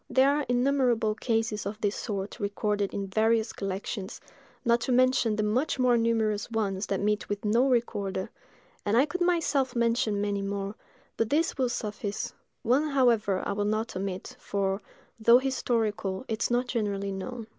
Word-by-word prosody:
There 265 Hz, +1 st, +4 dB
are 295 Hz, -1 st, -1 dB
innumerable 245 Hz, -3 st, +2 dB
cases 225 Hz, -2 st, -1 dB
of 210 Hz, +1 st, -5 dB
this 205 Hz, -1 st, 0 dB
sort 200 Hz, 0 st, -4 dB
recorded 205 Hz, -1 st, -1 dB
in 200 Hz, -, -3 dB
various 220 Hz, +3 st, +1 dB
collections, 195 Hz, +1 st, -4 dB, 0.5 s
not 235 Hz, 0 st, +3 dB
to 255 Hz, -, -1 dB
mention 255 Hz, -3 st, +3 dB
the 215 Hz, -, 0 dB
much 245 Hz, +10 st, 0 dB
more 250 Hz, -2 st, +4 dB
numerous 225 Hz, -3 st, +1 dB
ones 205 Hz, -4 st, -1 dB
that 195 Hz, -, -1 dB
meet 210 Hz, 0 st, 0 dB
with 205 Hz, +1 st, -3 dB
no 235 Hz, +6 st, +3 dB
recorder; 205 Hz, -6 st, -1 dB, 0.5 s
and 205 Hz, +3 st, +2 dB
I 265 Hz, -, +6 dB
could 355 Hz, +5 st, -5 dB
myself 295 Hz, -7 st, +1 dB
mention 230 Hz, -3 st, +1 dB
many 200 Hz, -1 st, -1 dB
more, 195 Hz, 0 st, -3 dB, 0.4 s
but 225 Hz, -, 0 dB
these 320 Hz, +3 st, +1 dB
will 260 Hz, -3 st, +1 dB
suffice—one, 225 Hz, +5 st, -2 dB
however, 230 Hz, -8 st, +2 dB
I -, -, 0 dB
will 205 Hz, +1 st, -1 dB
not 215 Hz, +1 st, -1 dB
omit, 195 Hz, +5 st, -4 dB
for, 195 Hz, 0 st, -1 dB, 0.4 s
though 235 Hz, +2 st, +7 dB
historical, 230 Hz, -6 st, -1 dB
it 220 Hz, 0 st, -3 dB
is -, -, +1 dB
not 245 Hz, +1 st, +1 dB
generally 205 Hz, -5 st, -2 dB
known. 225 Hz, +5 st, -5 dB
220 Hz, 165 wpm, -28 LUFS, 200-245 Hz, 0.5 s, though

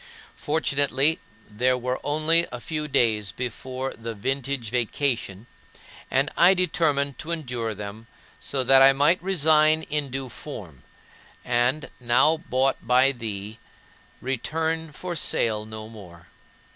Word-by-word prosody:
Fortunately, 145 Hz, 0 st, +1 dB, 0.3 s
there 125 Hz, +4 st, +1 dB
were 125 Hz, +1 st, -2 dB
only 155 Hz, +3 st, +2 dB
a 125 Hz, -, -6 dB
few 150 Hz, +3 st, -4 dB
days 110 Hz, -8 st, +1 dB
before 130 Hz, +2 st, -5 dB
the 115 Hz, 0 st, -7 dB
"vintage 130 Hz, +1 st, -2 dB
vacation"; 120 Hz, -4 st, -1 dB, 0.6 s
and 135 Hz, +3 st, +1 dB
I 180 Hz, +3 st, +6 dB
determined 150 Hz, -6 st, 0 dB
to 155 Hz, -, -8 dB
endure 125 Hz, -9 st, -3 dB
them, 105 Hz, +2 st, -8 dB, 0.3 s
so 135 Hz, -2 st, -2 dB
that 135 Hz, +1 st, +6 dB
I 135 Hz, 0 st, +8 dB
might 150 Hz, +6 st, +2 dB
resign 155 Hz, -3 st, +3 dB
in 150 Hz, -2 st, -2 dB
due 135 Hz, 0 st, -4 dB
form 100 Hz, -, -9 dB, 0.6 s
and, 125 Hz, +4 st, 0 dB
now 125 Hz, +6 st, +3 dB
bought 135 Hz, -4 st, 0 dB
by 125 Hz, +3 st, +4 dB
thee, 110 Hz, -3 st, -6 dB, 0.6 s
return 160 Hz, +5 st, -2 dB
for 175 Hz, +3 st, -6 dB
sale 110 Hz, -8 st, 0 dB
no 110 Hz, 0 st, -8 dB
more. 90 Hz, -6 st, -13 dB
130 Hz, 125 wpm, -24 LUFS, 115-150 Hz, 0.6 s, I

